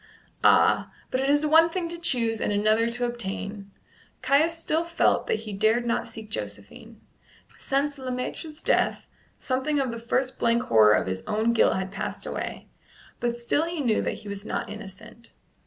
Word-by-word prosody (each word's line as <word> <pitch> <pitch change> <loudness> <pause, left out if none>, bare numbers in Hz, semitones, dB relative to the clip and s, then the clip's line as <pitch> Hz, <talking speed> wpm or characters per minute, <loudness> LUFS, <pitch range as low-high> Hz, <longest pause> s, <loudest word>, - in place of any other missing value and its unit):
Ah! - - +4 0.2
but 255 - 0
it 270 +1 0
is 290 +1 +3
one 325 +2 +6
thing 345 0 -3
to 340 - -5
choose 230 -9 0
and - - 0
another 215 +2 +2
to 245 +1 -2
obtain. 200 -3 -5 0.5
Caius 295 +6 +3
still 325 0 0
felt 335 0 +1
that 215 - 0
he 215 -2 -7
dared 220 +4 +2
not 235 - -1
seek 215 -1 -9
Josephine. 105 - -7 0.6
Since 280 +1 -1
Le 260 -1 -5
Maître's 300 +5 -5
death - - +1 0.3
something 270 +3 -1
of 265 -3 0
the 230 - -6
first 255 +3 -1
blank 235 0 +2
horror 110 -2 +5
of - - 0
his 95 0 -3
own 220 +2 +1
guilt 230 - +4
had 190 0 -3
passed - - -5
away, - - -5 0.5
but 240 0 -1
still 290 +6 +1
he 335 -1 -4
knew 240 -6 +1
that - - -2
he - - -8
was 200 0 -6
not 210 - -4
innocent. 215 +2 -11
235 Hz, 180 wpm, -26 LUFS, 215-280 Hz, 0.6 s, one